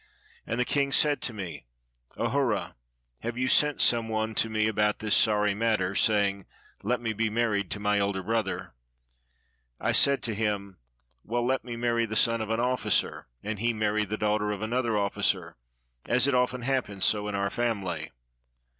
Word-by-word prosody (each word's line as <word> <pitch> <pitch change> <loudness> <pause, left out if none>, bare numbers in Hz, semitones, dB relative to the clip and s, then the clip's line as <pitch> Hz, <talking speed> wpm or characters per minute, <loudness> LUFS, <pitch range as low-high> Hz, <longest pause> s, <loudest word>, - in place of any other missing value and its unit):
And 115 - -2
the 125 - +2
king 140 +1 0
said 145 +1 +3
to - - -3
me, 90 - -7 0.5
"Ahura, 120 -1 0 0.5
have 120 +1 -5
you 130 +1 0
sent 150 +2 +3
some 115 -1 +3
one 110 0 -1
to 115 - +1
47 110 - -7
EGYPT 110 0 +2
me - - +2
about 105 -1 +1
this 110 -1 +1
sorry 105 -2 +3
matter, 105 -3 0
saying, 100 -2 +1 0.3
'Let 120 +4 -1
me 115 -2 -2
be 110 +1 0
married 105 -4 0
to 105 - -3
my 105 0 +1
elder 100 -1 -1
brother?'" 110 - -2 1.1
I - - 0
said 140 -1 +4
to 115 - -1
him, 100 -3 -3 0.4
"Well, 120 +1 -1
let 130 +1 0
me 120 0 -6
marry 115 -1 0
the 110 - -5
son 115 +1 +3
of 110 - -4
an 115 +1 0
officer, 125 +1 0 0.2
and 105 -1 -4
he 120 +2 +1
marry 110 -1 0
the 105 +1 -4
daughter 105 0 0
of 105 0 -3
another 115 -1 0
officer, 100 -1 0 0.5
as 125 +2 +3
it 140 - +2
often 125 0 +1
happens 125 -7 -1
so 105 -1 +2
in 105 - -3
our 100 0 -1
family." 110 -6 -2
110 Hz, 185 wpm, -27 LUFS, 105-120 Hz, 1.1 s, said